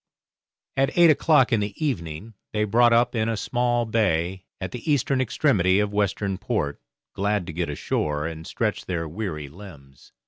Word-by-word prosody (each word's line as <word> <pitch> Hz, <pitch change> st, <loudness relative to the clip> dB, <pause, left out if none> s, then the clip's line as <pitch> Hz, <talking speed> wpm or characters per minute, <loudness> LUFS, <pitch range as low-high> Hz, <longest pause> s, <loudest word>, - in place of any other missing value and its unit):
At 135 Hz, +4 st, 0 dB
eight 170 Hz, -2 st, +8 dB
o'clock 150 Hz, -4 st, +3 dB
in 110 Hz, -, +3 dB
the 100 Hz, -1 st, -3 dB
evening 110 Hz, -, -3 dB, 0.2 s
they 105 Hz, 0 st, +1 dB
brought 120 Hz, +3 st, +4 dB
up 120 Hz, +1 st, +3 dB
in 110 Hz, -1 st, 0 dB
a 115 Hz, -, -1 dB
small 120 Hz, +2 st, 0 dB
bay 95 Hz, -5 st, 0 dB
at 95 Hz, -, -5 dB
the 125 Hz, +5 st, -3 dB
eastern 135 Hz, -1 st, +2 dB
extremity 100 Hz, -, +2 dB
of 105 Hz, 0 st, 0 dB
Western 100 Hz, -1 st, -1 dB
Port, 105 Hz, -10 st, -2 dB, 0.3 s
glad 100 Hz, -1 st, 0 dB
to 85 Hz, -, -7 dB
get 85 Hz, 0 st, -2 dB
ashore 75 Hz, +1 st, -2 dB
and 80 Hz, -1 st, -6 dB
stretch -, -, -2 dB
their 80 Hz, -3 st, -2 dB
weary 80 Hz, -4 st, -5 dB
limbs. 75 Hz, -5 st, -14 dB
105 Hz, 170 wpm, -24 LUFS, 85-120 Hz, 0.3 s, eight